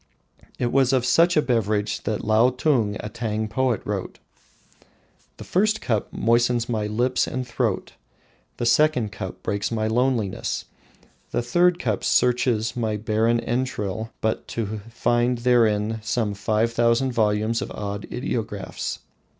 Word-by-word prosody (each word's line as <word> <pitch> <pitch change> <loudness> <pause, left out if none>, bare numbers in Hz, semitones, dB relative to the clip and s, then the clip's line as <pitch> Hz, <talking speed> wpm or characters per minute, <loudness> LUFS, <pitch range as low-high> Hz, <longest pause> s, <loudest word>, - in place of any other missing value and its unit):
It 120 -1 -1
was 135 -1 +3
of 130 -2 +2
such 170 +6 +4
a 150 - +4
beverage 105 -4 0
that 110 - -2
Lotung, 115 0 +2
a - - -5
Tang 110 -1 -3
poet, 125 -1 0
wrote: - - -4 1.2
"The - - -8
first 215 +4 +1
cup 110 -5 -1
moistens 120 +1 +2
my 110 -3 -1
lips 120 +4 +1
and 130 -1 -4
throat, 120 - -2 0.6
the 120 - -2
second 125 -3 +3
cup 95 -1 -7
breaks 100 +2 -2
my 110 -1 -1
loneliness, 115 -3 0 0.6
the - - -1
third 175 +8 +3
cup 110 - -2
searches 120 -3 +2
my 110 -3 -1
barren 110 +2 +1
entrail 115 -4 -2
but 110 0 -1
to 110 -2 -4
find 120 +1 +1
therein 115 -3 +2
some 105 -1 -1
five 110 +3 0
thousand 120 +3 +2
volumes 110 0 +1
of - - -4
odd 100 0 -5
ideographs. 115 -4 -3
115 Hz, 135 wpm, -24 LUFS, 105-125 Hz, 1.2 s, such